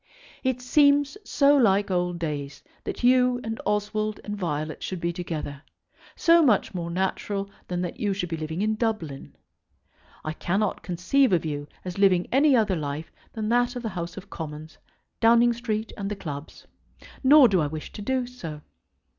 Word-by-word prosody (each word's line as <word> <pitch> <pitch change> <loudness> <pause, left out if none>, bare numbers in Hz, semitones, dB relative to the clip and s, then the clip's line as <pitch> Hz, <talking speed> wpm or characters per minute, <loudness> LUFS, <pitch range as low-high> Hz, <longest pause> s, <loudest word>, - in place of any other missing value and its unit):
It 255 -1 -1
seems 285 +3 +4
so 285 0 +4
like 200 -6 +3
old 180 -1 0
days 145 -4 -4 0.2
that - - -5
you 250 0 +4
and 225 0 -4
Oswald 210 +1 -1
and 205 - -4
Violet 155 -5 -3
should 185 - -4
be 170 0 -1
together, 155 -5 -5 0.5
so 335 0 +5
much 225 -6 +3
more 170 -2 -4
natural 195 +2 -2 0.2
than 180 -1 -2
that 175 - -5
you 205 - 0
should 190 -2 -2
be 165 - -2
living 160 +4 -3
in 215 0 +1
Dublin. 215 - -3 0.9
I 155 - -2
cannot 195 +5 -1
conceive 195 +9 +2
of 170 -3 +2
you 145 -1 -4 0.2
as 180 +1 -5
living 185 -3 +4
any 275 +1 +5
other 215 -5 +2
life 150 0 -4 0.2
than 220 -2 -3
that 245 +1 +2
of 245 - -5
the 225 - -2
House 175 -2 -5
of 195 +1 -8
Commons, 155 -1 -7 0.4
Downing 235 +1 +5
Street, 225 -2 -3
and 200 -1 -4
the 210 - -3
clubs. 150 -5 -8 0.6
Nor 280 0 +8
do 190 -5 +2
I 150 - +1
wish 155 +1 -7
to - - -8
do 255 +4 0
so. 165 -12 -8
200 Hz, 175 wpm, -26 LUFS, 170-240 Hz, 0.9 s, Nor